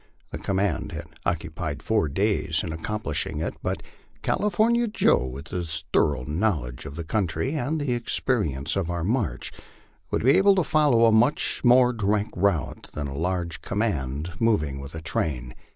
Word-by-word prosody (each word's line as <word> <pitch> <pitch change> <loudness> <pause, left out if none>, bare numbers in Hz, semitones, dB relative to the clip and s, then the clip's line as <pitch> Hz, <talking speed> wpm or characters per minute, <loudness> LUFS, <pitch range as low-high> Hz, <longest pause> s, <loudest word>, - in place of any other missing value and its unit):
The - - -5
command 100 +1 -1
had - - -5 0.2
occupied 80 -3 -3
four 105 -8 +1
days 95 -1 +1
in 80 - -4
accomplishing 85 -2 -3
it, 80 - -2
but - - -2 0.4
California 230 +3 +2
Joe, 65 - +3
with 70 +5 -8
his 85 -2 -3
thorough 70 -4 +2
knowledge 75 - -1
of 70 - -8
the 85 - -4
country, 100 - -1
and 155 +1 -1
the 145 -2 -2
experi 110 - 0
ence 70 +4 -2
of 95 -3 -1
our 85 -1 -2
march, 105 - -1 0.6
would - - -1
be 130 - +6
able 200 0 +6
to 185 - +3
follow 150 -8 +4
a 115 - +6
much 115 +6 +2
more 125 0 +6
direct 105 -1 0
route 90 -3 0
than 75 - -3
a 70 -1 -5
large 85 +1 -2
command 80 - -2
moving 75 -12 +1
with 70 +3 -8
a 80 - -5
train. 65 -7 -2
90 Hz, 170 wpm, -25 LUFS, 75-115 Hz, 0.6 s, be